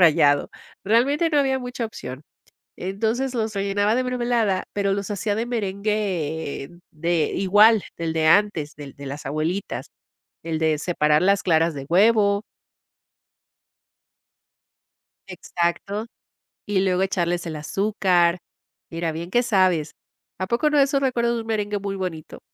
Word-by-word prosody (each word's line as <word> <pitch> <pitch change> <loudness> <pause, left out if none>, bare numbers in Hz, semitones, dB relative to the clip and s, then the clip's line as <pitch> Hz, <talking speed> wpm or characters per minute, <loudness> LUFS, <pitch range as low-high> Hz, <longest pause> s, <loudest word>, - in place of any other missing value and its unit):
rallado. 150 -4 +4 0.3
Realmente 275 - +2
no 300 - +3
había 265 -1 +1
mucha 245 -2 -4
opción. 135 - -7 0.5
Entonces, 225 +8 -2
los 220 -3 -2
rellenaba 200 +2 +1
de 255 - +1
mermelada, 240 -6 0
pero 200 -1 0
los 200 +1 -3
hacía 205 +1 -1
de 225 +2 -1
merengue 195 - -2 0.2
de 165 0 0
igual 205 +3 +5
del 165 -1 -2
de 160 -1 +1
antes, 160 -5 +2
del 145 -2 -10
de 140 - -10
las 145 +2 -7
abuelitas, 155 +8 -3 0.5
el 165 -1 -2
de 155 -2 +2
separar 150 -3 +2
las 200 +1 +3
claras 165 -2 +2
de 135 -1 -6
huevo. 200 +2 +4 2.8
Exacto, 195 +5 -3 0.6
y 205 -2 0
luego 185 -1 +1
echarles 175 -2 0
el 160 -2 -5
azúcar. 180 0 +1 0.5
Mira, 165 0 -2
bien 165 +2 -6
que 240 +6 +2
sabes. 185 -9 +2 0.5
¿A 185 - -2
poco 240 +8 +1
no 300 - +1
de 280 - +7
eso 275 0 0
recuerdas 240 -3 +1
un 230 -1 -3
merengue 210 -2 -1
muy 200 0 -4
bonito? 180 -5 -6
195 Hz, 140 wpm, -23 LUFS, 165-220 Hz, 2.8 s, de